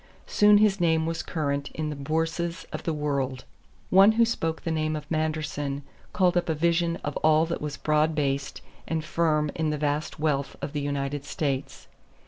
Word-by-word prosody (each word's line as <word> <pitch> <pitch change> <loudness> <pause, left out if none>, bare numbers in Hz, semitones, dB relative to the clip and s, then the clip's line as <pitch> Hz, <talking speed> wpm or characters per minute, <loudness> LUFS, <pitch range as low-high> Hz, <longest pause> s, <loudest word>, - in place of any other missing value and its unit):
Soon 210 0 +5
his 205 -2 +3
name 160 -2 +3
was 165 0 -2
current 140 -3 -2
in 155 -1 -2
the - - -4
bourses 165 +4 -2
of - - -4
the 165 - +1
world. 140 -4 -2 0.5
One 195 +3 +7
who 230 +1 +4
spoke 165 -8 -2
the 165 - -2
name 155 -1 0
of 150 -1 -5
Manderson 150 -3 -2 0.3
called 180 -2 +2
up 175 -1 +1
a 160 - +1
vision 170 +1 +1
of 145 - -3
all 155 +1 +4
that 170 +1 -4
was 150 -1 -4
broad 155 +1 +1
based 140 -2 -1 0.3
and 160 -1 -2
firm 155 -3 +1
in 160 -1 -1
the 150 - -1
vast 150 +1 -2
wealth 145 -3 0
of 140 - -5
the 145 - -2
United 140 0 -2
States. 140 -2 -3
155 Hz, 185 wpm, -26 LUFS, 145-165 Hz, 0.5 s, One